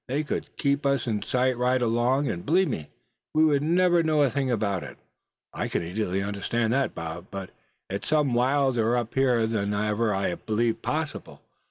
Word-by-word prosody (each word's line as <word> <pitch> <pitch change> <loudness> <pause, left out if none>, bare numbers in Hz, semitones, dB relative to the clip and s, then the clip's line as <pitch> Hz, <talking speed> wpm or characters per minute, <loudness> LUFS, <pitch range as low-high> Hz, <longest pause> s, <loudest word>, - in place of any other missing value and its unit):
They 140 +4 -1
could 150 - -4
keep 140 0 +1
us 140 -3 +1
in 110 -4 -1
sight 130 0 +1
right 125 +1 +2
along, 125 +4 +1
and 85 -7 -3
believe 180 +5 +2
me, 75 -2 -4 0.5
we 155 +1 +5
would 145 -3 +3
never 175 +2 +3
know 155 -2 +3
a 135 - +2
thing 135 -2 -1
about 100 -6 0
it." - - -9 0.6
"I - - -2
can - - -2
easily 95 +2 -2
understand 110 +3 -1
that, 135 0 0
Bob. 85 +2 -6
But 95 -2 -7 0.4
it's 100 +1 -5
some 150 -4 +2
wilder 125 -2 +2
up 120 -2 -3
here 125 -4 +3
than 105 -2 -1
ever 105 +2 0
I 95 -2 0
believed 115 +4 -1
possible. 155 -1 -4
120 Hz, 185 wpm, -26 LUFS, 105-140 Hz, 0.6 s, we